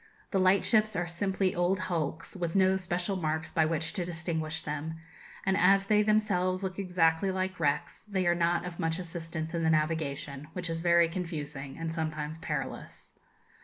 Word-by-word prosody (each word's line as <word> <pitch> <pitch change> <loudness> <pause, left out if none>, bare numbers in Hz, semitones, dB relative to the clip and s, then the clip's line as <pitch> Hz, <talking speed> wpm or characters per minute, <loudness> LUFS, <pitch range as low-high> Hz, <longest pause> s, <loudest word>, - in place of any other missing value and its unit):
The 195 - +2
lightships 200 +3 +4
are 175 - 0
simply 190 +2 0
old 180 +2 +1
hulks, 165 -2 -3
with 170 -2 -3
no 190 -1 +5
special 180 +1 -1
marks 160 -2 -2
by 160 - +3
which 160 +2 -2
to 190 -4 -1
distinguish 160 -2 -3
them; 150 +2 -4 0.5
and 190 0 +3
as 195 +1 +5
they 210 +1 +4
themselves 200 -3 +2
look 190 0 -3
exactly 180 -1 +2
like 185 -1 -2
wrecks, 150 +1 0
they 190 -2 0
are 175 - +4
not 175 +1 +1
of 175 -1 -7
much 165 0 0
assistance 165 -2 -4
in 170 - -1
the 160 - +2
navigation, 155 -2 -1
which 175 -2 -3
is 165 - -2
very 170 0 +5
confusing, 150 -6 -5
and 165 0 -3
sometimes 155 -1 -3
perilous. 145 -5 -5
170 Hz, 170 wpm, -30 LUFS, 160-185 Hz, 0.5 s, no